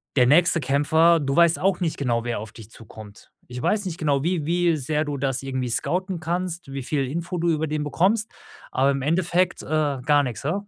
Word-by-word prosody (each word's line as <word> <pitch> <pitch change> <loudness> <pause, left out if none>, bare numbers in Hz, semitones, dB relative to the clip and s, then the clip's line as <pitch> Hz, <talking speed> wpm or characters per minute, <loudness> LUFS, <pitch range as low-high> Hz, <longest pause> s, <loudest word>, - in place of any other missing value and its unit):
der 125 -3 +4
nächste 170 +3 +4
Kämpfer 160 +5 +3
du 135 -1 -2
weißt 170 -1 +4
auch 190 -1 0
nicht 165 -3 -1
genau, 120 -4 -1
wer 120 -2 -3
auf 105 0 -9
dich 110 -1 -12
zukommt. 110 -2 -14 0.2
Ich 125 0 -6
weiß 210 -1 +1
nicht 175 -3 -5
genau, 145 -3 0
wie 170 -3 -1
wie 175 -1 +1
sehr 150 +2 -1
du 145 -2 -4
das 135 -1 -1
irgendwie 130 -2 -3
scouten 180 - -1
kannst, 175 -2 -3
wie 135 -1 -5
viel 140 0 -1
Info 170 +6 -4
du 170 +1 0
über 160 0 0
den 150 0 -2
bekommst, 195 +9 +1 0.4
aber 135 +2 +2
im 135 0 -2
Endeffekt, 175 +4 0
äh, - - -11 0.4
gar 145 0 +4
nix, 120 -6 -5
he? 155 - 0
150 Hz, 215 wpm, -23 LUFS, 135-170 Hz, 0.4 s, der